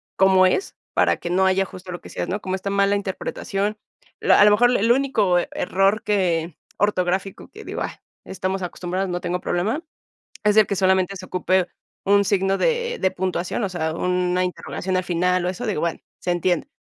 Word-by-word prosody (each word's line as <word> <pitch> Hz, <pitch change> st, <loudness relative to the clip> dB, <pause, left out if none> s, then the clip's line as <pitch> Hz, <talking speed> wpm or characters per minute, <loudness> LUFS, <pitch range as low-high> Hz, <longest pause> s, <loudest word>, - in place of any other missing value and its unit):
cómo 190 Hz, -1 st, +5 dB
es, 385 Hz, -, 0 dB, 0.2 s
para -, -, +3 dB
que 170 Hz, -, -6 dB
no 190 Hz, +2 st, +2 dB
haya 190 Hz, +1 st, +2 dB
justo 185 Hz, 0 st, -10 dB
lo 175 Hz, -, -6 dB
que -, -, -12 dB
decías, -, -, -4 dB
¿no? 205 Hz, -, -1 dB
Como 185 Hz, 0 st, -2 dB
está 190 Hz, +1 st, -4 dB
mala 200 Hz, 0 st, +2 dB
interpretación, 200 Hz, +1 st, -3 dB, 0.4 s
la -, -, +5 dB
a 205 Hz, -, +8 dB
lo 210 Hz, -, +6 dB
mejor 245 Hz, +4 st, +5 dB
el 225 Hz, +4 st, +3 dB
único 230 Hz, -9 st, +2 dB
error 195 Hz, +4 st, +1 dB
que 175 Hz, -6 st, 0 dB, 0.2 s
ortográfico 190 Hz, -1 st, -1 dB
que -, -, -12 dB
digo: -, -, -5 dB
"Ay, -, -, -2 dB, 0.3 s
estamos 190 Hz, 0 st, -3 dB
acostumbrados, 180 Hz, +2 st, -3 dB
no 175 Hz, 0 st, -3 dB
tengo 180 Hz, 0 st, -2 dB
problema", 210 Hz, -, -1 dB, 0.6 s
es 210 Hz, -1 st, +3 dB
de 215 Hz, -1 st, +7 dB
que 200 Hz, -, -2 dB
solamente 190 Hz, 0 st, +2 dB
se 185 Hz, -1 st, -8 dB
ocupe 185 Hz, 0 st, +1 dB, 0.4 s
un 200 Hz, +1 st, +4 dB
signo 195 Hz, 0 st, +1 dB
de 480 Hz, 0 st, 0 dB
de 190 Hz, -, +1 dB
puntuación, 185 Hz, +3 st, -2 dB
o 200 Hz, -, -1 dB
sea, 160 Hz, -3 st, -2 dB
una 180 Hz, +1 st, 0 dB
interrogación 185 Hz, +1 st, -4 dB
al 185 Hz, -, 0 dB
final 180 Hz, +1 st, +1 dB
o -, -, +1 dB
eso, 230 Hz, +7 st, -5 dB
digo, 200 Hz, -8 st, -1 dB
bueno, 170 Hz, -1 st, -1 dB, 0.2 s
se 180 Hz, -, -2 dB
entiende, 175 Hz, -1 st, 0 dB
190 Hz, 195 wpm, -22 LUFS, 180-200 Hz, 0.6 s, a